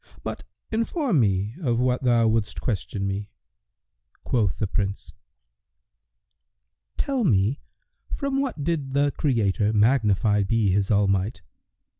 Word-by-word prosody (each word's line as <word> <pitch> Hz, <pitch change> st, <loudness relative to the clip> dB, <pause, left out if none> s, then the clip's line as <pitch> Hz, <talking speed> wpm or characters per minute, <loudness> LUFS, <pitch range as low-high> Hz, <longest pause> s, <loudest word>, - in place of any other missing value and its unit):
But -, -, -6 dB, 0.3 s
inform 230 Hz, -, 0 dB
me 100 Hz, -1 st, +1 dB
of 120 Hz, -6 st, 0 dB
what 125 Hz, 0 st, +1 dB
thou 120 Hz, -3 st, +3 dB
wouldst 110 Hz, -1 st, 0 dB
question 100 Hz, -, -3 dB
me." 100 Hz, +1 st, -3 dB, 0.9 s
Quoth 105 Hz, -7 st, 0 dB
the 105 Hz, -, 0 dB
Prince, 100 Hz, 0 st, -3 dB, 1.8 s
"Tell 270 Hz, -3 st, 0 dB
me 110 Hz, -, +2 dB, 0.5 s
from 275 Hz, -1 st, -1 dB
what 245 Hz, -, -3 dB
did 145 Hz, -4 st, -2 dB
the 145 Hz, 0 st, +3 dB
Creator 110 Hz, -6 st, +1 dB
(magnified 105 Hz, -3 st, +3 dB
be 110 Hz, -3 st, +2 dB
His 100 Hz, +1 st, +1 dB
all 105 Hz, -2 st, +3 dB
might!) 95 Hz, -1 st, -1 dB
115 Hz, 120 wpm, -24 LUFS, 100-140 Hz, 1.8 s, thou